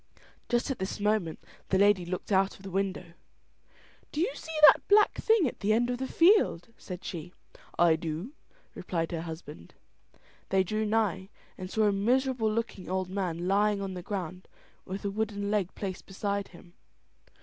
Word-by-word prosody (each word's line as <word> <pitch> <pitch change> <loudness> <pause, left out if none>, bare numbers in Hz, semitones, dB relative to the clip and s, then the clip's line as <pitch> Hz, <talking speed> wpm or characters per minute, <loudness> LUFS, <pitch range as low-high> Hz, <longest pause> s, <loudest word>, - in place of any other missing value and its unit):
Just 240 +2 +1
at 265 - -4
this 190 +2 -4
moment 205 -6 0 0.3
the 190 - +3
lady 200 -2 +4
looked 185 +3 -5
out 195 0 +2
of 190 - -17
the 195 - -7
window. 190 -2 -2 1.0
"Do 295 - -4
you 375 +9 +1
see 320 -1 -7
that - - +6
black 415 +1 +5
thing 440 -8 +3
at - - -6
the 210 +2 +2
end 240 +2 +2
of 245 - -3
the 265 - -2
field?" 335 - +3
said 180 -4 -8
she. 175 0 -6 0.4
"I 170 -2 +5
do," 165 - -5 0.4
replied 165 -1 -3
her 165 -2 -3
husband. 160 - -9 0.7
They 190 0 +3
drew 215 +3 -1
nigh, 210 -4 0 0.3
and 185 -1 -7
saw 220 +2 +1
a 210 - +4
miserable 240 +2 +1
looking 215 -5 -3
old 185 0 -2
man 180 -3 -2
lying 205 +1 +2
on 195 -1 -4
the 180 - -6
ground 185 -1 -5 0.4
with 195 +2 -6
a 200 - 0
wooden 205 -1 -2
leg 200 -4 -1
placed 190 -3 -5
beside 200 +1 -2
him. 175 -1 -16
195 Hz, 175 wpm, -29 LUFS, 180-220 Hz, 1.0 s, that